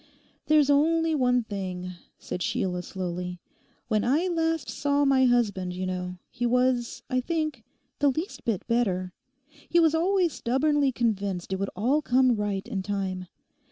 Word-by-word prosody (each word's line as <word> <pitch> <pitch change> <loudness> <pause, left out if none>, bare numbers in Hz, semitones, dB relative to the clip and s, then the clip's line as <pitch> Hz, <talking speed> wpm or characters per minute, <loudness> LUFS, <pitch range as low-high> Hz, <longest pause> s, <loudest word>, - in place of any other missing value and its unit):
'There's 300 -2 +5
only 325 +3 +3
one 250 -4 +2
thing,' 185 -4 -5 0.3
said 180 - -6
Sheila 180 -1 -1
slowly. 180 0 -5 0.5
'When 215 -2 +1
I 305 +9 +2
last 325 -4 0
saw 285 0 +1
my 265 -1 +4
husband, 205 -7 +1
you 185 +1 -3
know, 180 0 -4
he 245 - -5
was, 250 -1 +1
I 255 -1 0
think, 310 -4 -2 0.4
the 285 - +4
least 270 -1 -4
bit 220 -6 -1
better. 190 -6 0 0.6
He 345 - +4
was 325 -2 +4
always 355 +1 +2
stubbornly 280 +3 +1
convinced 200 -6 -1
it 190 - -2
would 195 - -1
all 255 +10 +2
come 255 -2 +3
right 205 -2 -2
in 195 - -3
time. 190 -2 -3
245 Hz, 155 wpm, -27 LUFS, 190-290 Hz, 0.6 s, There's